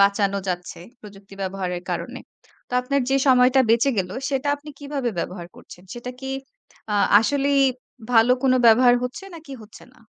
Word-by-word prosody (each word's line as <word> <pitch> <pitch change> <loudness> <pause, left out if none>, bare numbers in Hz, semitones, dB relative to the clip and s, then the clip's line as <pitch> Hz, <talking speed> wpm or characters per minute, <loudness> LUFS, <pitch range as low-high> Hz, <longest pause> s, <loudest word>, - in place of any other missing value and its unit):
বাঁচানো 200 0 +2
যাচ্ছে, 180 0 -4 0.2
প্রযুক্তি 195 -1 -14
ব্যবহারের 185 -2 -4
কারণে। - - -4 0.5
তো - - -17
আপনার 275 +3 -1
যে 270 - +3
সময়টা 255 +1 +5
বেঁচে 235 +4 +3
গেল, 180 -1 -2 0.2
সেটা 280 +1 -2
আপনি 295 +1 -12
কিভাবে 280 -4 -3
ব্যবহার 175 0 -5
করছেন? 180 - -14
সেটা 240 +1 -7
কি 265 - -6 0.6
আ - - 0 0.3
আসলেই 280 +3 +1 0.5
ভালো 230 +2 +5
কোনো 255 -1 +3
ব্যবহার 245 +2 +6
হচ্ছে, 250 +10 -5
নাকি 310 -4 -12
হচ্ছে 215 - -15
না? - - -24
245 Hz, 160 wpm, -22 LUFS, 200-275 Hz, 0.6 s, ব্যবহার